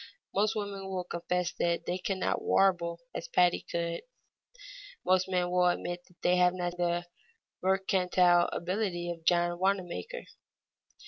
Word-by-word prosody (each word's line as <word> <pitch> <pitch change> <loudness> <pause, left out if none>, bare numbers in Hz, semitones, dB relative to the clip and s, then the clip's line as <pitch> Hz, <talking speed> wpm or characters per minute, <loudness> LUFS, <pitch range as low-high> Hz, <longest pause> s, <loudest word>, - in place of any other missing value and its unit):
Most 210 +2 +2
women 200 -2 -4
will 185 -1 -2
confess 175 0 -2
that 170 0 0
they 180 +1 -2
cannot 190 0 -1
warble 170 -3 +2
as - - -5
Patti 180 -1 +3
could, 170 0 -2 1.0
most 185 0 +3
men 180 -1 0
will 180 0 +4
admit 175 0 -1
that 180 - -26
they 180 0 +4
have 180 0 +4
not 175 -1 -2
the 175 0 0 0.6
mercantile 185 -2 +3
ability 175 -1 -2
of 165 -1 -8
John 175 0 +2
Wanamaker. 195 - -1
180 Hz, 135 wpm, -30 LUFS, 175-190 Hz, 1.0 s, will